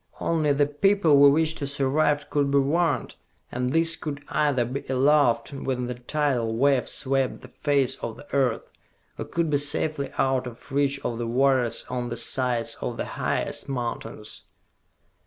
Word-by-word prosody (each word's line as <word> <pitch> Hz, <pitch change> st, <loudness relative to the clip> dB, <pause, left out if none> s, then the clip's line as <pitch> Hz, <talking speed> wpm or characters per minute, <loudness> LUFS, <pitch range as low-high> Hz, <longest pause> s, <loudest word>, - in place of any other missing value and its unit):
Only 155 Hz, -3 st, +1 dB
the 145 Hz, +1 st, +3 dB
people 155 Hz, 0 st, +3 dB
we 140 Hz, 0 st, +8 dB
wish 160 Hz, +2 st, +2 dB
to 145 Hz, -3 st, -4 dB
survive 145 Hz, +1 st, 0 dB
could 145 Hz, -1 st, +1 dB
be 140 Hz, -, +3 dB
warned, 145 Hz, 0 st, +1 dB, 0.4 s
and 125 Hz, +1 st, -2 dB
these 165 Hz, +2 st, +3 dB
could 145 Hz, -2 st, -6 dB
either 140 Hz, -5 st, +1 dB
be 130 Hz, +4 st, -4 dB
aloft 135 Hz, -2 st, +3 dB
when 130 Hz, -2 st, -3 dB
the 125 Hz, -, -3 dB
tidal 125 Hz, -2 st, -1 dB
wave 135 Hz, 0 st, +2 dB
swept 135 Hz, -1 st, -1 dB
the 130 Hz, -, -12 dB
face 140 Hz, -1 st, 0 dB
of 115 Hz, -1 st, -6 dB
the 145 Hz, -, -12 dB
earth, 130 Hz, -5 st, 0 dB, 0.5 s
or -, -, -3 dB
could 170 Hz, -2 st, -1 dB
be 145 Hz, -, +3 dB
safely 145 Hz, 0 st, -1 dB
out 130 Hz, -1 st, +1 dB
of 125 Hz, +3 st, -12 dB
reach 140 Hz, 0 st, +1 dB
of 115 Hz, -1 st, -2 dB
the 120 Hz, -, -2 dB
waters 130 Hz, 0 st, +2 dB
on 125 Hz, -1 st, -3 dB
the 120 Hz, -, -4 dB
sides 120 Hz, 0 st, -1 dB
of -, -, -3 dB
the -, -, -2 dB
highest -, -, -3 dB
mountains!" 115 Hz, -4 st, -5 dB
140 Hz, 170 wpm, -25 LUFS, 125-145 Hz, 0.5 s, we